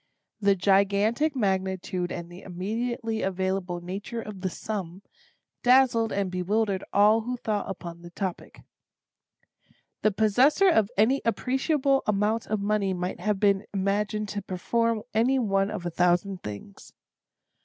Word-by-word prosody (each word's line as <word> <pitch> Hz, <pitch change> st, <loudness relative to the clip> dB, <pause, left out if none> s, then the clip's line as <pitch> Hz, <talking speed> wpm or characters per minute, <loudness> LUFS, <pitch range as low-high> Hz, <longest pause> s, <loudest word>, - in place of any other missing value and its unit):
The 200 Hz, -1 st, +3 dB
gigantic 200 Hz, -, +2 dB
magnitude 190 Hz, -4 st, -1 dB
and 170 Hz, 0 st, -6 dB
the 175 Hz, +2 st, -11 dB
immediately 225 Hz, +5 st, -3 dB
available 190 Hz, -1 st, -2 dB
nature 200 Hz, +6 st, -5 dB
of 210 Hz, -4 st, -8 dB
the 185 Hz, -, -1 dB
sum, 190 Hz, -1 st, -5 dB, 0.6 s
dazzled 245 Hz, -3 st, +4 dB
and 195 Hz, -2 st, -1 dB
bewildered 195 Hz, +2 st, 0 dB
all 210 Hz, +3 st, +5 dB
who 250 Hz, +3 st, -4 dB
thought 210 Hz, -4 st, -2 dB
upon 170 Hz, -3 st, -7 dB
the 175 Hz, -, -10 dB
topic. 185 Hz, +1 st, -5 dB, 1.4 s
The 215 Hz, -, +4 dB
possessor 245 Hz, -, +4 dB
of 220 Hz, -, +3 dB
any 250 Hz, +6 st, +3 dB
appreciable 270 Hz, +3 st, +1 dB
amount 210 Hz, +2 st, +1 dB
of 215 Hz, -1 st, -1 dB
money 200 Hz, -2 st, 0 dB
might 180 Hz, +1 st, -4 dB
have 210 Hz, -2 st, -1 dB
been 200 Hz, -1 st, +2 dB
imagined 205 Hz, +2 st, 0 dB
to 205 Hz, 0 st, -3 dB
perform 220 Hz, +4 st, -1 dB
any 240 Hz, +5 st, +3 dB
one 195 Hz, -5 st, +1 dB
of 210 Hz, -5 st, -5 dB
a 175 Hz, -, -2 dB
thousand 180 Hz, +3 st, +1 dB
things. 100 Hz, -1 st, -9 dB
200 Hz, 135 wpm, -26 LUFS, 190-225 Hz, 1.4 s, all